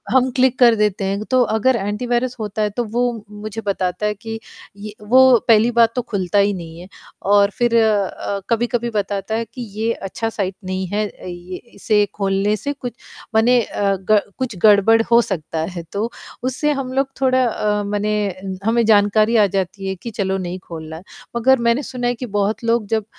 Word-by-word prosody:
हम 260 0 +4
क्लिक 260 -1 +3
कर 235 -2 +6
देते 210 -2 0
हैं। 200 +2 -2
तो 255 - +4 0.2
अगर 260 +4 +3
एंटीवायरस 240 +4 -1
होता 215 0 -3
है, 210 - +1
तो 240 +4 -2
वो 240 +2 0 0.2
मुझे 215 +1 -7
बताता 185 0 -1
है 210 - +1
कि 225 +2 -7 0.4
ये 205 +1 -8
वो 255 +2 +6
पहली 230 +1 +5
बात 230 -1 +4
तो 250 - +1
खुलता 200 -4 -1
ही 200 0 +3
नहीं 165 -2 -8
है 180 - -10 0.5
और 200 0 +5
फिर 240 -1 +2 0.8
कभी-कभी 240 +1 0
बताता 205 0 -2
है 230 +1 -1
कि 255 - -7 0.2
ये 225 +1 +1
अच्छा 225 +4 -4
साइट 195 -4 -3
नहीं 185 0 -3
है। 210 0 0
अ, - - -15
ये 180 0 -7 0.2
इसे 210 +1 +2
खोलने 195 +1 0
से 285 +7 -4
कुछ 250 -4 -7 0.4
माने 240 +2 +4
अ, 200 -2 -1 0.2
ग 215 - +7 0.2
कुछ 260 -3 -3
गड़बड़ 215 +2 +6
हो 235 - +7
सकता 165 -6 -4
है। 175 -2 -6
तो 215 +4 -2 0.3
उससे 260 +4 0
हम 270 -3 -3
लोग 270 0 +1
थोड़ा 260 -1 +3
अ, 210 -2 0
मने 205 +1 -1 0.5
हमें 235 +1 +3
जानकारी 215 +1 +4
आ 210 - +6
जाती 195 +1 -2
है 190 - -2
कि 230 +6 -8
चलो 195 -2 -1
नहीं 180 0 -5
खोलना। 160 0 -8 0.3
मगर 260 +2 +4
मैंने 235 +5 +2
सुना 245 -2 -3
है 245 - 0
कि 250 - -6
बहुत 205 0 -1
लोग 230 -1 +1
जब 220 -1 -1
215 Hz, 190 wpm, -19 LUFS, 200-240 Hz, 0.8 s, ग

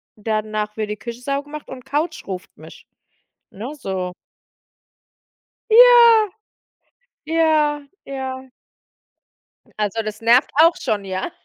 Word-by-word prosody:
danach 215 0 -3
wird 215 -1 -3
die 210 - -4
Küche 235 +2 -8
saubergemacht 285 +3 -5
und 255 -1 -9
Couch 305 +4 -3
ruft 185 -2 -7
mich, - - -14 0.7
ne? 230 +9 -7
So 190 -8 -4 1.6
Ja, 470 -2 +7 1.0
ja, 305 -3 +1 0.2
ja. 265 -1 -6 1.3
Also 210 +1 -1
das 215 -1 -6
nervt 235 +4 +4
auch 330 +1 +5
schon, 205 -2 -2
ja. 190 - -4
260 Hz, 105 wpm, -20 LUFS, 215-305 Hz, 1.6 s, Ja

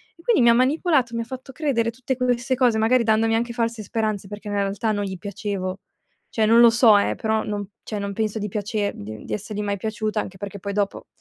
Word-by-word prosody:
E 335 - -18
quindi 455 - +3
mi 235 - +6
ha - - +7
manipolato, 260 0 +2
mi 230 - -1
ha - - -5
fatto 260 +2 -8
credere 250 -5 0
tutte 255 +2 -3
queste 250 0 0
cose, 245 -3 +3
magari 235 +3 +3
dandomi 225 0 +2
anche 235 +1 -1
false 230 -2 -2
speranze 215 -2 -2
perché 205 0 -8
nella 205 0 0
realtà 200 +3 -1
non 205 -1 -1
gli 190 -2 -4
piacevo. 195 -1 -4 0.5
Cioè 220 - +1
non 230 +2 +6
lo 235 - +9
so 230 -2 +6
eh, 200 - +1
però 220 0 0
non 205 -2 -4
cioè 210 - -4
non 200 0 -3
penso 220 +1 -2
di 210 - -2
piacer 210 0 -2
di 110 +1 -8
di - - -5
essergli 210 0 -4
mai 205 -1 -1
piaciuta, 215 +1 -2
anche 190 - -9
perché 200 +1 -7
poi 200 +2 -4
dopo 200 -1 -2
220 Hz, 235 wpm, -23 LUFS, 205-235 Hz, 0.5 s, lo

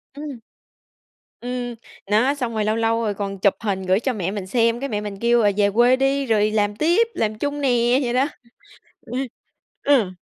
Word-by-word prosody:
Ừm. 290 -4 -7 1.0
Ừm, 245 -1 -4 0.4
đó, 235 +7 +3
xong 245 -5 -3
rồi 215 -1 -1
lâu 215 - +1
lâu 230 0 +1
rồi 210 -2 0
còn 195 -1 -5
chụp 200 0 +4
hình 200 -4 -1
gửi 185 +2 +3
cho 255 +1 -1
mẹ 190 -3 -2
mình 200 -3 -5
xem, 230 +2 +2
cái 275 0 -4
mẹ 210 -1 -2
mình 205 -2 -6
kêu 235 0 +3
là 205 - +4
về 200 -1 +3
quê 240 +4 +4
đi 270 +1 +1
rồi 215 -3 +2
làm 205 -1 0
tiếp, 345 - +3
làm 215 -1 -1
chung 290 +3 -3
nè, 245 -1 +3
vậy 240 0 -1
đó. 260 +2 +3 0.8
Ừ. - - -14 0.7
Ừ. 255 -10 +3
230 Hz, 200 wpm, -22 LUFS, 210-255 Hz, 1.0 s, chụp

